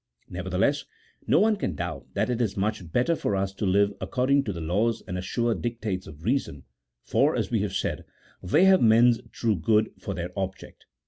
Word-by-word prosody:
Nevertheless, -, -, -1 dB, 0.4 s
no -, -, +4 dB
one 220 Hz, 0 st, +4 dB
can 90 Hz, -, -3 dB
doubt -, -, -5 dB
that -, -, 0 dB
it 125 Hz, 0 st, -1 dB
is 105 Hz, -4 st, -1 dB
much 100 Hz, -4 st, -2 dB
better 125 Hz, -, +2 dB
for 100 Hz, -, -1 dB
us 95 Hz, 0 st, -1 dB
to 100 Hz, +1 st, -2 dB
live 100 Hz, +2 st, +3 dB
according 135 Hz, +2 st, +1 dB
to 105 Hz, -, -2 dB
the 85 Hz, -, -6 dB
laws 105 Hz, +8 st, 0 dB
and 90 Hz, -, -4 dB
assured 115 Hz, +5 st, -1 dB
dictates 110 Hz, -6 st, -3 dB
of 80 Hz, 0 st, -12 dB
reason, 110 Hz, -, -1 dB, 0.4 s
for, -, -, +2 dB
as -, -, -2 dB
we -, -, 0 dB
said, -, -, -3 dB, 0.4 s
they 150 Hz, -, +3 dB
have 190 Hz, -1 st, +6 dB
men's 115 Hz, +1 st, +5 dB
true 115 Hz, -3 st, 0 dB
good 105 Hz, +6 st, +2 dB
for 100 Hz, 0 st, -5 dB
their 90 Hz, +1 st, -4 dB
object. 95 Hz, -1 st, -6 dB
105 Hz, 190 wpm, -26 LUFS, 95-120 Hz, 0.4 s, have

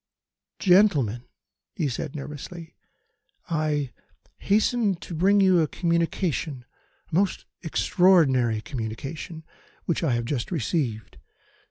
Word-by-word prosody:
"Gentlemen," 150 Hz, -, +3 dB, 0.5 s
he 160 Hz, -, 0 dB
said 135 Hz, +3 st, -4 dB
nervously, 150 Hz, +3 st, -8 dB, 0.8 s
"I 150 Hz, -4 st, 0 dB, 0.5 s
hasten 215 Hz, 0 st, +2 dB
to 170 Hz, +1 st, -9 dB
bring 195 Hz, +5 st, +4 dB
you 185 Hz, -2 st, +5 dB
a 155 Hz, -, +1 dB
communication, 170 Hz, -5 st, -1 dB, 0.5 s
a -, -, -16 dB
most 190 Hz, +4 st, +1 dB, 0.2 s
extraordinary 145 Hz, -, +3 dB
communication, 135 Hz, -, -6 dB, 0.4 s
which 170 Hz, -, -1 dB
I 140 Hz, -7 st, +2 dB
have 120 Hz, 0 st, -1 dB
just 120 Hz, -1 st, -2 dB
received. 125 Hz, -, -2 dB
160 Hz, 105 wpm, -25 LUFS, 130-180 Hz, 0.8 s, you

